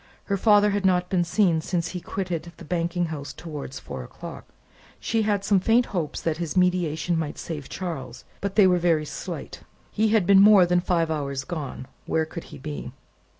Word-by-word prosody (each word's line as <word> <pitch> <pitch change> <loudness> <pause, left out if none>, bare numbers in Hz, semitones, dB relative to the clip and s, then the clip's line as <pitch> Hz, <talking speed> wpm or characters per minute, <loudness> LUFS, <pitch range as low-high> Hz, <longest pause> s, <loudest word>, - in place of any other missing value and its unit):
Her 200 - -1
father 205 +1 +5
had 200 0 -1
not 180 -1 +2
been 180 -2 +3
seen, 170 -2 +2
since 170 0 -2
he 180 - -5
quitted 175 -4 -4
the - - -11
banking 175 +1 -1
house 145 -2 -6
towards 150 -5 -7
four 65 - -7
o'clock. - - -9 0.5
She 225 0 0
had 205 -2 0
some 200 -1 +4
faint 230 +6 +3
hopes 165 -5 -2
that 160 -2 -1
his 170 +1 -3
mediation 180 -2 +1
might 155 -2 -4
save 150 -5 -6
Charles, 135 -9 -6 0.2
but 200 -1 -3
they 205 - +7
were 180 -1 +4
very 165 -3 +2
slight. - - -7 0.3
He 220 +1 +2
had 215 -3 +3
been 195 0 +7
more 200 -3 +8
than 175 0 +2
five 170 -2 0
hours 140 -3 -2
gone: 145 -3 -5 0.2
where 160 0 +1
could 165 +1 -8
he - - -11
be? 145 -2 -6
175 Hz, 195 wpm, -25 LUFS, 155-195 Hz, 0.5 s, more